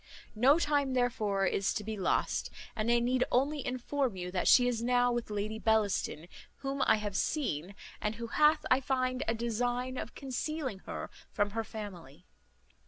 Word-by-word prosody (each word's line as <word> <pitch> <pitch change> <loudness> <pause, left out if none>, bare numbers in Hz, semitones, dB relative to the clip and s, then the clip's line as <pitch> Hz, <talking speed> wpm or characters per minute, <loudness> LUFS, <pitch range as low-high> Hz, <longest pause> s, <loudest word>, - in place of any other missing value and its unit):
No 260 +7 +5
time 290 -5 +1
therefore 220 -6 +1
is 195 +1 0
to 210 - -2
be 220 +1 -4
lost; 190 -3 0 0.3
and 215 +1 -1
I 240 - +5
need 250 +2 +2
only 280 +3 +1
inform 255 -1 -1
you, 180 -1 -5
that 180 -1 -1
she 245 -1 +7
is 235 -2 -1
now 245 +1 +3
with 240 -2 -2
Lady 210 +1 -3
Bellaston, 210 -7 +1 0.3
whom 275 0 -3
I - - +6
have 210 -2 -4
seen, 195 - -1 0.3
and 210 +1 -1
who 230 +1 -5
hath, 300 +5 +3
I 255 +1 +5
find, 255 -1 0
a 225 - +1
design 245 +2 -1
of - - -7
concealing 270 -3 -3
her - - -5 0.2
from 205 -1 0
her 225 +2 -2
family. 180 -8 -9
235 Hz, 170 wpm, -31 LUFS, 210-255 Hz, 0.3 s, she